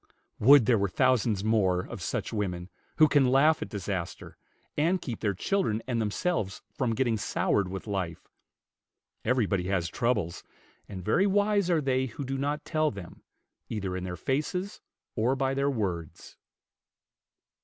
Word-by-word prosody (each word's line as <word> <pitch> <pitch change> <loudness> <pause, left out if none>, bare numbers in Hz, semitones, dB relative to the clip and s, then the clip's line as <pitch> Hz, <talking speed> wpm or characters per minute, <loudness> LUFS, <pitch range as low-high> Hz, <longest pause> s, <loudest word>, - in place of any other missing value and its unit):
Would 135 +1 +7
there 115 -2 +3
were 100 0 +1
thousands 115 -3 +2
more 100 -5 +2
of - - -8
such - - -3
women, 90 -4 -3 0.3
who 155 0 +7
can 145 -4 +4
laugh 150 +4 +4
at - - -4
disaster, 95 -4 -5 0.4
and 170 +5 +2
keep 120 -9 -5
their 100 -3 -1
children 115 - 0
and 120 -3 -1
themselves 105 - -2
from 120 -4 -1
getting 120 -2 +1
soured 100 -1 0
with 95 +1 -6
life. 95 -6 -4 1.0
Everybody 105 -7 +1
has 90 -3 0
troubles; 105 -7 -1 0.5
and 95 -3 -7
very 175 - +3
wise 205 -1 +2
are 165 -3 +3
they 130 -1 +1
who 130 +4 -6
do 135 +1 -3
not 145 +2 -2
tell 155 -1 +1
them, 100 -7 -10 0.5
either 100 -4 -3
in 95 - -4
their 90 -1 -5
faces 180 +8 -2 0.3
or 120 +4 +2
by 135 0 0
their 140 +1 +1
words. 90 - -4
115 Hz, 155 wpm, -28 LUFS, 95-140 Hz, 1.0 s, Would